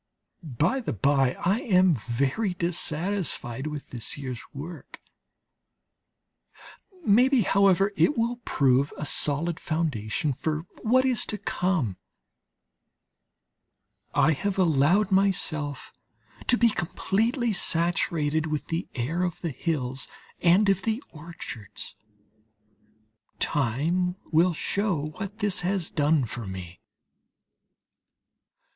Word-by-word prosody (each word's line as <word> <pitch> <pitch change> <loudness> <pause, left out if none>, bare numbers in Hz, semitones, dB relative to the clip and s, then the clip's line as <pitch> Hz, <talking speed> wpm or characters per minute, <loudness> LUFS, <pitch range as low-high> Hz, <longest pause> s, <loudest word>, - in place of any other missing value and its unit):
By 160 - 0
the 245 - -3
bye, 135 +3 +2
I 195 +5 +3
am 185 -6 +4
very 140 - -1
dissatisfied 170 - -1
with 150 -2 -6
this 120 -3 -4
year's 130 -4 -5
work; 160 +5 -9 2.1
maybe, 250 +5 +5
however, 195 0 +3
it 295 - +3
will 235 +1 0
prove 140 - +2
a 150 - -4
sound 155 +4 0
foundation 150 -5 -1
for 155 +4 -3 0.2
what 255 +4 +3
is 255 -3 +1
to 210 - -3
come. 170 - -1 2.2
I 150 - +5
have 195 +6 -1
allowed 180 +4 +3
myself 155 -8 0 0.5
to 245 - +5
be 235 -1 +5
completely 225 - 0
saturated 165 -3 +1
with 150 -1 -3
the 165 +2 -2
air 140 +9 -1
of 180 -2 -2
the 170 - -2
hills 135 -3 -2 0.3
and 180 +4 +5
of 195 -1 +3
the 225 +7 -2
orchards; 150 - -8 1.4
time 160 +7 0 0.2
will 170 +2 +4
show 180 -6 -1
what 205 0 -5
this 205 -3 +2
has 185 -1 -1
done 150 -2 +2
for 115 -1 -5
me. 90 -2 -8
165 Hz, 105 wpm, -26 LUFS, 140-195 Hz, 2.2 s, maybe